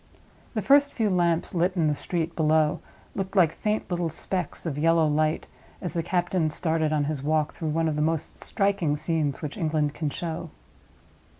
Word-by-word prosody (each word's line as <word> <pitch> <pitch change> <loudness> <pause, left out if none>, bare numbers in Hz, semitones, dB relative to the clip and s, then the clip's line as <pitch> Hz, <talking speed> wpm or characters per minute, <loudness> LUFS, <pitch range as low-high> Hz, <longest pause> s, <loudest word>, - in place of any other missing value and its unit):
The 215 - -1
first 285 +1 +5
few 220 -4 +1
lamps 170 -2 +1
lit 180 +1 +2
in 170 -3 +2
the 150 - +3
street 165 +2 -3
below 155 -1 +2 0.3
looked 195 +1 -4
like 175 -5 +5
faint 215 +3 -1
little 175 -1 0
specks 180 +3 -3
of 160 -4 -2
yellow 165 +1 +4
light, 155 +1 +1 0.3
as 175 - -4
the 170 - 0
captain 175 -1 0
started 160 -1 0
on 150 -1 +2
his 145 -1 -2
walk 155 +1 +1
through 160 - -4
one 165 +2 +1
of 155 - 0
the 150 - 0
most 160 0 -1
striking 195 -7 +1
scenes 155 -2 -1
which 150 +4 -4
England 155 -4 0
can 155 -2 -2
show. 165 +2 -5
165 Hz, 185 wpm, -26 LUFS, 155-175 Hz, 0.3 s, first